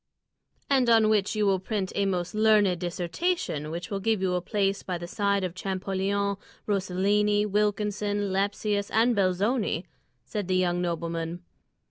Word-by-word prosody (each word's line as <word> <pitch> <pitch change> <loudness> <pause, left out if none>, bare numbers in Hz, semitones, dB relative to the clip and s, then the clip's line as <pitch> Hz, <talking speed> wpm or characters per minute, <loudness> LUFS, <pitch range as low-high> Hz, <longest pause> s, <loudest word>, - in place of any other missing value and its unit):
"And 260 -3 +3
on 225 -2 +5
which 210 -1 +2
you 210 -1 +1
will 195 -1 +3
print 195 0 -3
a 200 -1 +1
most 180 -2 -2
learned 210 -4 +4
dissertation 175 - -2
which 170 +4 -6
will 200 - -1
give 220 +1 +1
you 185 -1 0
a 180 - 0
place 195 +1 0
by 180 -2 -3
the 175 - -7
side 200 +1 0
of 180 -2 -2
Champollion, 195 +2 -1 0.3
Rosellini, 205 +2 +1
Wilkinson, 205 -1 0
Lepsius, 205 +1 0
and 230 +2 +3
Belzoni," 195 0 +1 0.4
said 205 -4 -4
the 185 -1 +2
young 175 -1 +1
nobleman. 170 0 -3
200 Hz, 150 wpm, -27 LUFS, 180-210 Hz, 0.4 s, on